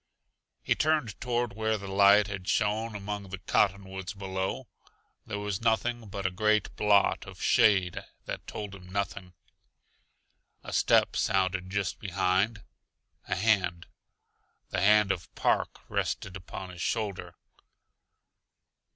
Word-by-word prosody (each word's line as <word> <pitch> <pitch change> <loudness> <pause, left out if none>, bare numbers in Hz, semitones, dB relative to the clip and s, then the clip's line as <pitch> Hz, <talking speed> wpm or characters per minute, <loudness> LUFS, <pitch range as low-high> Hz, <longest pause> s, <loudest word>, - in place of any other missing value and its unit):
He - - +3
turned 150 -9 0
toward 120 -3 -1
where 110 +1 0
the 100 -1 -8
light 100 +1 +6
had 95 -2 -6
shone 110 +1 0
among 100 -1 -5
the 95 - -5
cottonwoods 95 0 0
below; 95 -1 -3 0.6
there 105 - -3
was 105 -1 -3
nothing 115 +1 0
but 100 0 -6
a 95 - +2
great 105 +3 +1
blot 105 -1 +3
of - - -11
shade 95 -5 +3 0.2
that - - -6
told 105 -2 -6
him 90 -2 -12
nothing. 95 -2 -3 1.3
A - - -7
step - - +3
sounded 95 -1 +1
just 100 -3 -2
behind. 95 +2 0 0.6
A - - 0
hand, 90 -4 +1 0.8
the - - -1
hand 105 0 +5
of 90 -3 -4
Park, - - 0
rested 95 - -2
upon 95 0 -7
his 90 -1 -9
shoulder. 105 -4 -2
100 Hz, 125 wpm, -29 LUFS, 95-105 Hz, 1.3 s, light